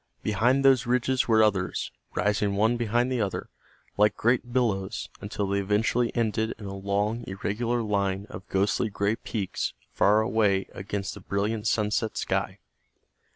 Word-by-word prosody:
Behind 120 +7 +2
those 130 -2 +5
ridges 125 +1 +1
were 110 -2 +5
others, 95 -4 0 0.2
rising 105 -1 +1
one 110 +4 +3
behind 120 +2 +1
the 125 -3 0
other, 100 -3 -3 0.5
like 105 0 +3
great 120 +1 +1
billows, 110 -7 -1
until 100 0 -3
they 100 +1 0
eventually 110 +4 +1
ended 110 -1 0
in 105 - -9
a 100 - -5
long, 100 +4 -1
irregular 115 +5 -1
line 100 -2 0
of 95 - -9
ghostly 100 +3 +1
gray 100 +2 0
peaks 105 -4 -3 0.2
far 105 +2 +4
away 105 -4 +2
against 100 +1 -4
the - - -10
brilliant 105 +2 -2
sunset 110 +1 0
sky. - - -1
105 Hz, 150 wpm, -27 LUFS, 100-115 Hz, 0.5 s, those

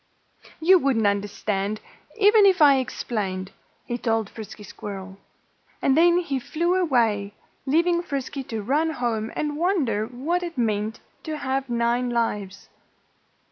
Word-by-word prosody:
"You 365 +3 +6
wouldn't 260 -7 +1
understand, 200 0 -1 0.4
even 415 -1 +6
if 380 -2 +3
I 285 -3 +7
explained," 195 -7 -3 0.3
he 240 0 -3
told 225 -3 0
Frisky 215 -1 -9
Squirrel. 195 -1 -8 0.6
And 270 - +2
then 345 +2 +5
he 285 -7 -1
flew 340 +7 -1
away, 230 - +1 0.3
leaving 340 +4 +3
Frisky 280 -4 -4
to 225 -3 -4
run 295 +8 +1
home 235 -6 -2
and 295 -1 -2
wonder 285 - +1
what 285 +9 -2
it 345 -4 -6
meant 215 -2 -1 0.2
to 310 -1 -5
have 270 -1 -2
nine 240 +1 +1
lives. 210 -5 -2
245 Hz, 135 wpm, -24 LUFS, 215-315 Hz, 0.6 s, I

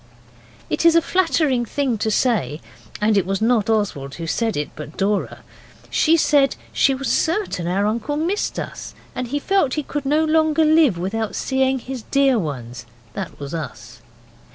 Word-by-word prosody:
It - - -1
is 335 0 +6
a 335 - +6
flattering 320 -9 +1
thing 250 -1 -1
to 220 - 0
say, 215 - +1 0.4
and 210 +1 +2
it 195 - +3
was 195 0 -1
not 225 -2 +2
Oswald 190 -11 -1
who 165 - -6
said 225 +5 -1
it, 150 - -3
but 150 +1 -9
Dora. 200 +1 -1 0.5
She 330 +1 +4
said 285 -4 +3 0.2
she 270 - +3
was 270 +1 -4
certain 325 - 0
our 195 +3 +1
uncle 230 +7 -1
missed 355 +7 -1
us, - - -6 0.2
and 255 - -4
that - - -13
he 290 - 0
felt 305 -3 +1
he 300 - -1
could 285 0 -4
no 305 +3 +3
longer 315 0 +3
live 310 - +4
without 205 +5 -3
seeing 265 0 +1
his 255 0 -6
dear 270 0 +2
ones 120 - -6 0.3
(that 190 -3 -6
was 140 +1 -6
us). 135 -7 -7
240 Hz, 175 wpm, -21 LUFS, 195-295 Hz, 0.5 s, is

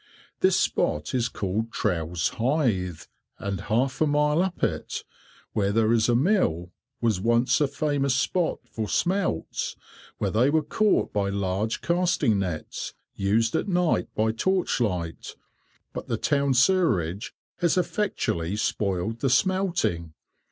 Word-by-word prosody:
This - - +4
spot 75 0 0
is 125 -1 +1
called 105 +4 -2
Trowse 85 -5 -1
Hythe, 115 - 0 0.3
and 100 -2 -4
half 130 +6 0
a 155 - +4
mile 150 +2 +2
up 185 -1 -3
it, - - -2 0.5
where 100 -1 +1
there 110 +1 +3
is 115 0 +3
a 120 - +4
mill, 120 - +1 0.3
was 110 -6 +1
once 120 +6 +2
a 145 - +4
famous 140 -1 0
spot 165 +5 0
for 110 -2 -4
smelts, 180 - -1 0.4
where - - -1
they 120 +5 +3
were 155 +1 +2
caught 215 +7 +1
by 100 -1 0
large 100 +2 -1
casting 170 - +2
nets, 90 -5 -4 0.2
used 110 +4 +1
at - - 0
night 180 -3 +1
by 110 +1 +2
torch 185 +7 0
light, 90 -7 -3 0.6
but - - -6
the - - -1
town 140 -2 +1
sewage 125 - +2 0.2
has 175 0 +1
effectually 105 - -1
spoiled 105 0 -1
the 135 - +1
smelting. 165 - +1
115 Hz, 135 wpm, -26 LUFS, 100-155 Hz, 0.6 s, This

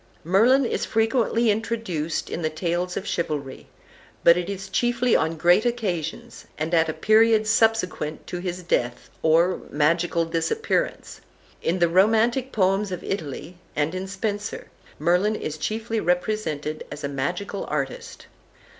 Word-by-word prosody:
Merlin 230 - +4
is - - -1
frequently 225 0 +2
introduced 205 -8 -2
in - - -3
the 155 - 0
tales 175 +3 -2
of 195 - -4
chivalry, 150 -8 -3 0.6
but 170 - +7
it 175 +1 -2
is 195 -1 -5
chiefly 240 +4 +1
on 160 +1 +1
great 175 +6 +4
occasions, 195 -10 -3
and 160 +3 -3
at 165 -1 +3
a - - -1
period 220 +2 +4
subsequent 220 -8 +1
to 180 - -5
his 180 0 -4
death, 120 -7 -1
or 170 +3 +3
magical 165 +3 +1
disappearance. 165 - -2 0.4
In 170 - 0
the 175 -1 +3
romantic 225 +8 +3
poems 195 0 +1
of 180 - -5
Italy, 170 -1 -5 0.2
and 150 +3 0
in 185 +1 -4
Spenser, 205 +2 -4 0.3
Merlin 180 +7 +2
is 155 -6 -5
chiefly 225 +6 -2
represented 175 -5 -1
as 145 - -7
a - - 0
magical 175 +9 -3
artist. 140 -3 -4
180 Hz, 140 wpm, -24 LUFS, 160-220 Hz, 0.6 s, but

